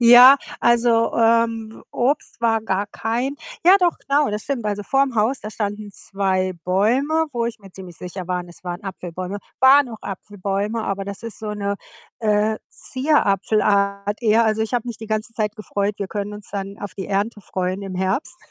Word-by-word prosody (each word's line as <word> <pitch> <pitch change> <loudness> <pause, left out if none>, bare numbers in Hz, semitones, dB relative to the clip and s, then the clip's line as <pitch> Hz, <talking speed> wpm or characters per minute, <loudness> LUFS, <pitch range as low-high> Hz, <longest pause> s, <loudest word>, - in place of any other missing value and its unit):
Ja, 245 +3 +10 0.2
also, 235 -1 +3
ähm, 230 -1 +2
Obst 245 -2 -1
war 225 -1 +2
gar 200 -2 -1
kein 240 +7 -2 0.3
ja, 375 +3 +8
doch, 350 -2 +2
genau, 285 -1 +1
das 210 0 -3
stimmt. 265 -6 -3
Also, 205 0 -1
vor‘m 270 +3 +1
Haus, 230 +5 +1
da 215 - -6
standen 205 -1 -4
2 190 -2 -1
Bäume, 260 - +2
wo 235 -2 0
ich 235 0 -5
mir 195 -2 -14
ziemlich 180 -3 -10
sicher 180 0 -7
waren, 180 -1 -2
es 175 - -15
waren 175 +2 -5
Apfelbäume. 185 +1 -5 0.2
Waren 270 +1 +7
auch 225 -2 -8
Apfelbäume, 200 +3 -3
aber 195 0 -2
das 200 +2 -7
ist 230 -1 -7
so 215 -1 -4
‘ne, 200 -1 -2 0.4
äh, 215 0 +2
Zierapfelart 205 - +1
eher. 225 0 +4
Also, 220 0 +1
ich 225 - -3
habe 245 -1 0
mich 235 -2 -4
die 220 - -8
ganze 215 +1 -2
Zeit 215 -1 -2
gefreut, 205 0 -2
wir 200 - -2
können 205 0 -4
uns 210 -1 -10
dann 200 0 -5
auf 205 - -7
die 190 - -5
Ernte 205 +2 -1
freuen 185 +1 -3
im 195 -1 -6
Herbst, 190 - -1
210 Hz, 185 wpm, -22 LUFS, 200-235 Hz, 0.4 s, Ja